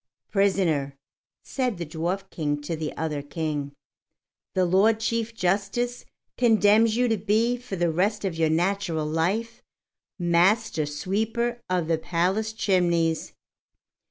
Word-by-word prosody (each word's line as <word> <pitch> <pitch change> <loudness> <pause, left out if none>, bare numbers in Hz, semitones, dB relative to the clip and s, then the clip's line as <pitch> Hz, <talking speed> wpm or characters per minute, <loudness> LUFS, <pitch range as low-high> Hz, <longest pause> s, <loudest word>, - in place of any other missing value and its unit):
"Prisoner," 180 -9 +1 0.5
said 250 -7 -2
the 170 - -4
Dwarf 175 +5 -3
King 145 -2 -2
to 165 +3 -3
the 155 -1 -4
other 155 -2 -2
King, 145 -1 -3 0.8
"the 185 -1 +3
Lord 200 +5 +3
Chief 230 0 -2
Justice 200 +6 -1 0.3
condemns 220 -1 +4
you 250 0 +3
to 225 -2 +1
be 220 +5 +1
for 245 -5 -7
the 175 -2 +1
rest 200 +5 0
of 190 - -1
your 160 -1 +2
natural 170 -1 0
life 200 +10 -1 0.6
Master 175 0 +2
Sweeper 220 +10 -2
of 180 -3 0
the 165 -1 +1
Palace 185 +7 0
Chimneys." 170 -6 +1
185 Hz, 130 wpm, -25 LUFS, 165-220 Hz, 0.8 s, condemns